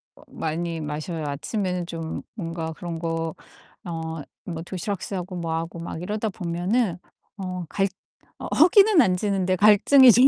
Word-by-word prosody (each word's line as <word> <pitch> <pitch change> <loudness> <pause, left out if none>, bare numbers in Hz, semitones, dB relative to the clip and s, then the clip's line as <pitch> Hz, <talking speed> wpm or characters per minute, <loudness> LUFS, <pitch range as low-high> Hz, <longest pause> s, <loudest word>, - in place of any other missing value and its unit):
어 - - -18
많이 165 +1 -3
마셔요. 155 +2 -4
아침에는 180 +5 -2
좀 165 -2 -4
뭔가 165 -5 -4
그런 170 0 -5
거 165 -1 -2 0.5
어 160 -2 -4 0.2
뭐 165 -3 -4
도시락 185 +2 -4
싸고 185 -1 -4
뭐 165 -1 -2
하고 165 +1 -4
막 165 0 -5
이러다 210 +4 -2
보면은 180 +3 0 0.4
어 185 -2 -4
갈 195 0 +1 0.5
어 - - -5
허기는 390 +3 +7
안 185 -1 +3
지는데 190 -1 +1
갈증이 215 +7 +8
좀 245 +4 +7
175 Hz, 275 characters per minute, -25 LUFS, 165-200 Hz, 0.5 s, 갈증이